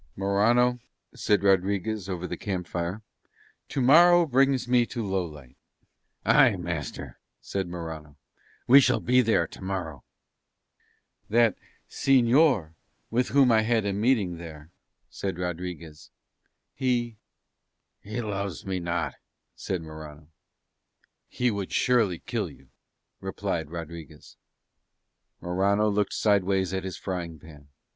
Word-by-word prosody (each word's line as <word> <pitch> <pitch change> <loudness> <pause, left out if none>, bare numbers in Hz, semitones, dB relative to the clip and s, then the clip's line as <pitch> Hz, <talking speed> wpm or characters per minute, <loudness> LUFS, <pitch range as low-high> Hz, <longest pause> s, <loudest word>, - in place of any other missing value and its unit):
"Morano," 115 +6 +2 0.3
said 105 -1 +1
Rodriguez 100 +1 +1
over 90 -1 -4
the - - -4
camp 95 -4 -4
fire, 90 +5 -4 0.7
"tomorrow 170 +6 +6
brings 135 -2 +2
me 125 -1 +4
to 120 -3 -4
Lowlight." 80 -9 -4 0.7
"Aye, - - +5
master," - - -5 0.2
said 95 -2 -4
Morano, 80 -4 -8 0.5
"we 135 +3 +8
shall - - +2
be 125 +1 +3
there 115 -2 +2
tomorrow." 90 -8 -6 1.3
"That 115 -1 +3 0.3
señor 130 - +3 0.4
with 125 +2 +1
whom 135 -3 +4
I 110 -1 +5
had 110 -1 +1
a 100 - 0
meeting 105 -5 +1
there," 80 -1 -11 0.4
said 95 -3 -5
Rodriguez, 90 -3 -6 0.6
"he 120 -4 -1 0.4
..." - - -54
"He 110 +4 -5
loves 100 -5 -4
me 95 -1 -2
not," 85 -4 -2 0.4
said 90 -3 -4
Morano. 80 -1 -11 1.0
"He 125 -1 0
would 100 -3 -4
surely 115 -8 +2
kill - - -3
you," - - -18 0.5
replied 95 -5 -3
Rodriguez. 85 -2 -9 1.1
Morano 100 +4 +1
looked 105 -1 0
sideways 95 -3 +1
at 95 0 -3
his 95 - -5
frying 85 -4 -5
pan. 75 -2 -15
95 Hz, 115 wpm, -26 LUFS, 85-115 Hz, 1.3 s, we